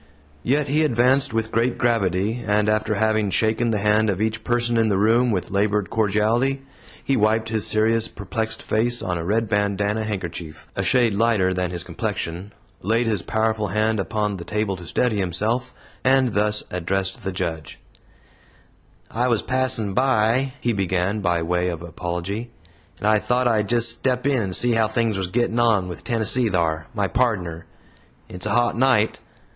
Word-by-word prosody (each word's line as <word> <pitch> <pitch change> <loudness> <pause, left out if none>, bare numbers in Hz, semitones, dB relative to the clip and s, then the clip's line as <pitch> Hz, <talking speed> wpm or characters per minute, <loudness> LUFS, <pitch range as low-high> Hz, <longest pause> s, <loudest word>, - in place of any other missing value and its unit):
Yet 140 - 0
he 150 +3 +2
advanced 130 +1 +2
with 110 0 -2
great 115 +2 0
gravity, 110 -1 0
and 105 0 +2
after 110 0 +1
having 110 -1 +1
shaken 110 +4 +1
the 110 - +1
hand 105 +1 +2
of 95 -2 -1
each 110 +1 -2
person 120 0 0
in 115 -1 +2
the 100 - +1
room 115 +5 +3
with 95 -6 -2
labored 105 0 0
cordiality, 115 +6 +1 0.4
he 135 - +1
wiped 110 +1 +1
his 110 -1 0
serious, 110 +1 +2
perplexed 110 -2 -4
face 120 +2 +1
on 90 -2 -2
a - - -4
red 110 +5 0
bandanna 105 +1 0
handkerchief, 85 -6 -6
a - - -1
shade 115 +3 +3
lighter 100 -3 +2
than 90 -1 -1
his 85 -1 -4
complexion, 90 +5 -4 0.3
laid 115 +5 +1
his 110 -5 0
powerful 110 +2 -1
hand 110 +3 0
upon 105 +2 -2
the 85 - -7
table 105 0 -2
to 85 -2 -11
steady 115 +5 0
himself, 110 +8 -1 0.3
and 130 -3 +3
thus 105 0 +1
addressed 95 +2 -2
the 95 - -2
Judge: 85 -4 -4 1.3
"I 120 +2 0
was 115 -4 +1
passin' 130 -6 +1
by," 130 +1 +2
he 120 - 0
began, 95 +1 -1
by 85 -4 0
way 90 +2 0
of 85 -1 -5
apology, 90 +7 -4 0.5
"and - - -6
I 110 0 +4
thought 125 +3 +1
I'd 105 -4 +1
just 120 -1 +3
step 125 +2 -2
in 140 -4 +2
and 95 -3 -2
see 120 - +4
how 115 -1 +2
things 110 0 0
was 95 -1 -2
gittin' 120 +4 0
on 110 -6 +2
with 90 -2 -8
Tennessee 115 0 +1
thar 80 -4 -1
my 100 -2 0
pardner. 95 -9 -1 0.6
It's 90 - -3
a - - 0
hot 120 -2 +2
night. 120 -3 +2
110 Hz, 175 wpm, -22 LUFS, 95-120 Hz, 1.3 s, I